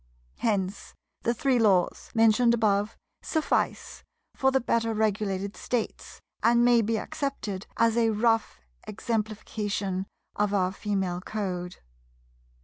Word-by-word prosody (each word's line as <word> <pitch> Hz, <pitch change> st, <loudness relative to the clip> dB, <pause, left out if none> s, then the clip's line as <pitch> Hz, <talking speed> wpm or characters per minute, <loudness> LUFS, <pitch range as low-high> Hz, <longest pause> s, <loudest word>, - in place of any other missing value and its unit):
Hence 200 Hz, -3 st, -2 dB, 0.3 s
the 235 Hz, -, +1 dB
Three 255 Hz, +1 st, +2 dB
Laws, 195 Hz, -5 st, +2 dB
mentioned 225 Hz, +1 st, +5 dB
above, 210 Hz, -1 st, +1 dB, 0.2 s
suffice 315 Hz, -2 st, -1 dB, 0.3 s
for 265 Hz, -, +2 dB
the 265 Hz, 0 st, +2 dB
better 230 Hz, -2 st, 0 dB
regulated 200 Hz, -2 st, -1 dB
States, 240 Hz, -3 st, -4 dB, 0.2 s
and 235 Hz, +1 st, +4 dB
may 240 Hz, -1 st, +5 dB
be 225 Hz, +1 st, 0 dB
accepted 215 Hz, -7 st, -4 dB
as 230 Hz, -1 st, +3 dB
a 230 Hz, -1 st, +3 dB
rough 225 Hz, -, +1 dB, 0.3 s
exemplification 210 Hz, -3 st, -3 dB, 0.3 s
of 205 Hz, 0 st, +1 dB
our 185 Hz, -2 st, +2 dB
Female 190 Hz, -3 st, -2 dB
Code. 180 Hz, -4 st, -4 dB
215 Hz, 115 wpm, -27 LUFS, 200-230 Hz, 0.3 s, mentioned